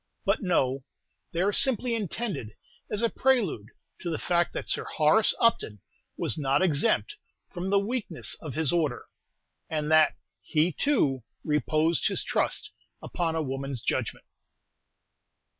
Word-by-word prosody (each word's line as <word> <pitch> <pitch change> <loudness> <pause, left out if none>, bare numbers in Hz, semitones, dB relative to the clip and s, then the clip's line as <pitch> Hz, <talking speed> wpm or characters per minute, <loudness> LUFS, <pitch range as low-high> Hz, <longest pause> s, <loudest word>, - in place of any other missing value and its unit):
But 195 +2 +1
no; 135 - +1 0.5
they 170 - -1
are 200 +2 +2
simply 250 -1 +3
intended 205 - -3 0.3
as 210 +2 -2
a 230 - +3
prelude 210 - +1 0.3
to 175 - -4
the 160 - -1
fact 175 -1 +1
that - - -5
Sir - - -1
Horace 155 +8 +3
Upton 170 - +2 0.4
was - - +1
not 140 +3 +2
exempt 185 - +1 0.3
from 180 0 -4
the 200 - +3
weakness 200 -4 -2
of 155 -5 -7
his 160 0 +1
order, 155 -7 0 0.6
and 155 -1 -2
that 155 -1 +5 0.3
he, 160 +3 +1
too, 155 - +1 0.2
reposed 155 +2 +1
his - - 0
trust - - -1 0.3
upon 165 -2 -2
a 160 - 0
woman's 135 -2 -4
judgment. - - -2
165 Hz, 140 wpm, -27 LUFS, 150-205 Hz, 0.6 s, that